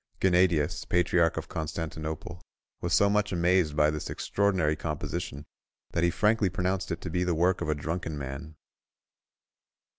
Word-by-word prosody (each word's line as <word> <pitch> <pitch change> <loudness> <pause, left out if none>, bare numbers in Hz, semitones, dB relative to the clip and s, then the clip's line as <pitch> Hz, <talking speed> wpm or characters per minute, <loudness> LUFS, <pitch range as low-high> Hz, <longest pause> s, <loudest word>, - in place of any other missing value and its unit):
Gennadius, 90 -4 +3
patriarch 90 -1 +2
of - - -4
Constantinople, 80 +1 -5 0.4
was - - -2
so 100 - +5
much 105 0 +1
amazed 90 -3 +2
by 75 0 +4
this 75 -1 -4
extraordinary 95 -7 +1
composition, 75 -2 -4 0.5
that 85 - 0
he 85 - +4
frankly 105 +3 +2
pronounced 90 +2 -1
it - - -3
to - - -5
be 90 - 0
the 90 -2 0
work 90 +3 +2
of - - -2
a 75 - +2
drunken 80 +1 -3
man." 70 +3 -6
85 Hz, 150 wpm, -28 LUFS, 75-90 Hz, 0.5 s, so